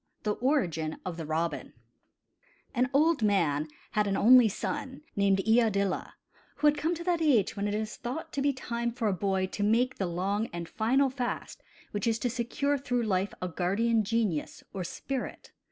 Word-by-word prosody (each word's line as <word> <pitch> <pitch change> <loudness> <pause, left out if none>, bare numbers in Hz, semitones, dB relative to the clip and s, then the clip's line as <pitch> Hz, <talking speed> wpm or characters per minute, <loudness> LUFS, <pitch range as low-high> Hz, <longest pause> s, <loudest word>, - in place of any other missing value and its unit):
THE 210 - +1
ORIGIN 175 - 0
OF 180 -2 -3
THE 160 -3 -5
ROBIN 165 +2 -2 1.0
|AN 250 0 +1
old 305 +1 +3
man 165 -8 +2 0.2
had 210 -1 +1
an 195 - 0
only 245 0 +7
son, 280 +6 -4
named 195 -1 +3
Iadilla, 215 -4 +2 0.4
who 295 - -2
had 295 0 +6
come 320 +4 0
to 340 - -6
that 345 -2 +1
age 260 - +3
when 200 0 -1
it 205 - -1
is 215 0 -3
thought 295 +7 -5
to 280 - -1
be 285 +1 +3
time 235 -3 -3
for 230 -2 -2
a 205 - +2
boy 190 0 0
to - - -4
make 235 +5 +2
the 190 - 0
long 195 +5 -1
and 170 -1 -5
final 260 +7 +2
fast 250 -2 -4 0.3
which 205 +1 -2
is 225 -1 +2
to 240 +2 -1
secure 275 +4 -1
through 245 -3 -1
life 195 -2 0
a - - 0
guardian 210 +6 +1
genius 210 -7 -1
or 190 -2 -3
spirit. 260 +9 -5
220 Hz, 185 wpm, -29 LUFS, 195-260 Hz, 1.0 s, only